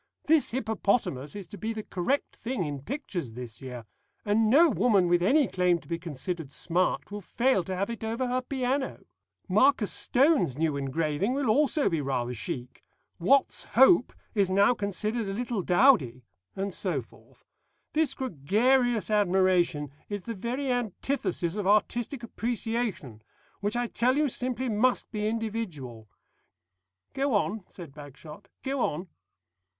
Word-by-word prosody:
This 315 Hz, -1 st, +4 dB
Hippopotamus 205 Hz, -, -1 dB
is 200 Hz, -2 st, -6 dB
to 205 Hz, -, -10 dB
be 220 Hz, +4 st, -2 dB
the 220 Hz, -1 st, -5 dB
correct 210 Hz, +11 st, -2 dB
thing 235 Hz, -5 st, -3 dB
in 145 Hz, -3 st, -4 dB
pictures 180 Hz, -, -5 dB
this 120 Hz, -3 st, -9 dB
year, 125 Hz, -3 st, -7 dB, 0.4 s
and 215 Hz, +1 st, +3 dB
no 310 Hz, +8 st, +7 dB
woman 200 Hz, -9 st, +3 dB
with 175 Hz, 0 st, +3 dB
any 275 Hz, -, +4 dB
claim 180 Hz, -1 st, +2 dB
to -, -, -16 dB
be 170 Hz, 0 st, -3 dB
considered 165 Hz, -1 st, -5 dB
smart 180 Hz, +6 st, -1 dB
will 205 Hz, 0 st, -5 dB
fail 235 Hz, 0 st, +1 dB
to 190 Hz, -, -3 dB
have 195 Hz, +2 st, -1 dB
it 230 Hz, -2 st, -7 dB
over 230 Hz, +4 st, -1 dB
her 250 Hz, +1 st, 0 dB
piano. 265 Hz, +1 st, -2 dB, 0.5 s
Marcus 215 Hz, +2 st, +3 dB
Stone's 270 Hz, -, +2 dB
new 155 Hz, -2 st, 0 dB
engraving 150 Hz, -, -1 dB
will 275 Hz, -5 st, +1 dB
also 290 Hz, +3 st, +2 dB
be 165 Hz, -5 st, 0 dB
rather 125 Hz, -3 st, -2 dB
chic. 125 Hz, +2 st, -6 dB, 0.4 s
Watts's 265 Hz, +11 st, +2 dB
Hope 265 Hz, +3 st, +6 dB, 0.2 s
is 200 Hz, -4 st, +2 dB
now 200 Hz, +5 st, +4 dB
considered 210 Hz, +1 st, -2 dB
a -, -, -3 dB
little 235 Hz, -1 st, -2 dB
dowdy.' 175 Hz, -, +3 dB, 0.3 s
And 195 Hz, 0 st, -3 dB
so 170 Hz, -10 st, -2 dB
forth. -, -, -22 dB, 0.5 s
This 305 Hz, -3 st, +1 dB
gregarious 240 Hz, -, +1 dB
admiration 185 Hz, -7 st, +2 dB, 0.2 s
is 205 Hz, -2 st, -4 dB
the 230 Hz, -, -4 dB
very 250 Hz, +6 st, -2 dB
antithesis 220 Hz, -6 st, -2 dB
of 205 Hz, -3 st, -2 dB
artistic 235 Hz, +5 st, +1 dB
appreciation, 225 Hz, -, -3 dB, 0.4 s
which 205 Hz, +3 st, -1 dB
I 240 Hz, 0 st, 0 dB
tell 250 Hz, +3 st, +1 dB
you, 300 Hz, -1 st, +2 dB
simply 255 Hz, +1 st, -2 dB
must 240 Hz, +3 st, +1 dB
be 210 Hz, -2 st, -2 dB
individual." 190 Hz, -, -4 dB, 1.0 s
"Go 270 Hz, -3 st, 0 dB
on," 205 Hz, 0 st, -1 dB
said 165 Hz, -7 st, -11 dB
Bagshot, 150 Hz, +6 st, -12 dB, 0.2 s
"go 275 Hz, 0 st, -2 dB
on." 175 Hz, -4 st, -1 dB
205 Hz, 150 wpm, -28 LUFS, 170-245 Hz, 1.0 s, no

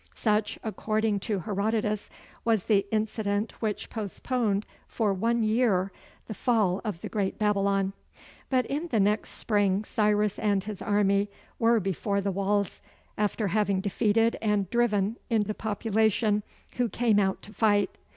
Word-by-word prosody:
Such, 210 Hz, -1 st, 0 dB
according 215 Hz, -1 st, 0 dB
to 200 Hz, -1 st, -2 dB
Herodotus, 210 Hz, +2 st, -1 dB, 0.3 s
was 225 Hz, -5 st, +2 dB
the 200 Hz, -2 st, +2 dB
incident 215 Hz, -1 st, -1 dB
which 215 Hz, -2 st, -3 dB
postponed 215 Hz, 0 st, -1 dB, 0.2 s
for 215 Hz, -4 st, 0 dB
one 230 Hz, +4 st, +1 dB
year 215 Hz, -4 st, +2 dB, 0.3 s
the 220 Hz, -, -6 dB
fall 210 Hz, -4 st, +1 dB
of 205 Hz, -7 st, -4 dB
the -, -, -4 dB
great 200 Hz, -3 st, -2 dB
Babylon. 200 Hz, -2 st, +1 dB, 0.6 s
But 255 Hz, -2 st, +2 dB
in 300 Hz, +7 st, -3 dB
the 235 Hz, -9 st, +1 dB
next 210 Hz, +2 st, +1 dB
spring 205 Hz, -2 st, +1 dB
Cyrus 210 Hz, -1 st, +1 dB
and 200 Hz, -3 st, +1 dB
his 210 Hz, -1 st, -6 dB
army 205 Hz, 0 st, +2 dB, 0.3 s
were 230 Hz, 0 st, +4 dB
before 200 Hz, +1 st, -1 dB
the 200 Hz, 0 st, -1 dB
walls, 200 Hz, 0 st, -1 dB, 0.3 s
after 210 Hz, 0 st, 0 dB
having 200 Hz, -1 st, +1 dB
defeated 220 Hz, +3 st, +2 dB
and 210 Hz, -3 st, +1 dB
driven 225 Hz, -2 st, +1 dB
in 225 Hz, -3 st, +3 dB
the 215 Hz, +1 st, -3 dB
population 220 Hz, 0 st, +1 dB, 0.4 s
who 245 Hz, -2 st, +1 dB
came 220 Hz, 0 st, +2 dB
out 190 Hz, -1 st, 0 dB
to 210 Hz, -, -11 dB
fight. 205 Hz, -3 st, +2 dB
210 Hz, 145 wpm, -27 LUFS, 200-220 Hz, 0.6 s, were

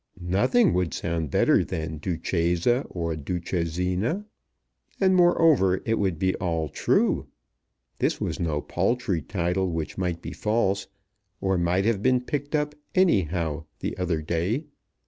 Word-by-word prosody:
Nothing 100 Hz, -, +3 dB
would 90 Hz, -2 st, 0 dB
sound 85 Hz, -3 st, -2 dB
better -, -, +3 dB
than 80 Hz, -1 st, -4 dB
Duchessa 90 Hz, -, 0 dB
or 85 Hz, -2 st, -3 dB
Duchessina! 90 Hz, -, -2 dB, 0.7 s
And, 190 Hz, -1 st, +4 dB
moreover, 160 Hz, -, +4 dB
it 115 Hz, 0 st, +1 dB
would 95 Hz, -5 st, 0 dB
be 95 Hz, +3 st, +1 dB
all 80 Hz, -4 st, -1 dB
true! -, -, +1 dB, 0.7 s
This -, -, +1 dB
was -, -, -3 dB
no 80 Hz, -4 st, -1 dB
paltry 110 Hz, -9 st, 0 dB
title 90 Hz, +2 st, -1 dB
which 80 Hz, 0 st, -4 dB
might 90 Hz, -2 st, -1 dB
be -, -, -7 dB
false, 105 Hz, -3 st, 0 dB, 0.5 s
or 95 Hz, 0 st, +1 dB
might 90 Hz, +2 st, +1 dB
have 110 Hz, -3 st, +1 dB
been 125 Hz, +2 st, +3 dB
picked 145 Hz, +3 st, -3 dB
up, 150 Hz, 0 st, 0 dB, 0.2 s
any 185 Hz, -, +5 dB
how, 80 Hz, -2 st, -3 dB
the -, -, -4 dB
other 85 Hz, -4 st, -1 dB
day. 85 Hz, -, -1 dB
90 Hz, 140 wpm, -26 LUFS, 85-115 Hz, 0.7 s, any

